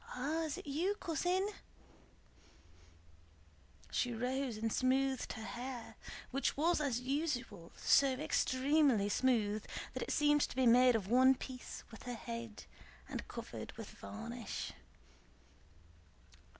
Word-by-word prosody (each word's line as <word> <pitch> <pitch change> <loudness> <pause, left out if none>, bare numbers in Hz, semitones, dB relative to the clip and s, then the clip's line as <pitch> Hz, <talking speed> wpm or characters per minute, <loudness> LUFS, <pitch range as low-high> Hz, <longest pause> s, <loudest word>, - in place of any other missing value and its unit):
"Ah, 305 +6 -1
is 305 - -3
it - - -8
you, 330 +8 0
cousin?" 360 +2 0 2.4
She 245 - +1
rose 250 +1 -1
and 225 0 -1
smoothed 265 0 +1
her 220 - -7
hair, 245 +1 -6 0.4
which 275 +1 0
was 330 +2 +3
as 265 -5 0
usual 255 - -2
so 275 -1 +5
extremely 265 -4 +2
smooth 215 -3 +2 0.3
that - - -4
it - - -3
seemed 295 0 +4
to - - -1
be 260 0 +3
made 245 +1 +7
of 205 -4 -1
one 260 +4 +6
piece 255 -1 -7
with 225 - -11
her 245 - -2
head 230 -2 -6 0.4
and - - -5
covered - - -7
with - - -8
varnish. 230 +1 -6
255 Hz, 125 wpm, -36 LUFS, 230-285 Hz, 2.4 s, made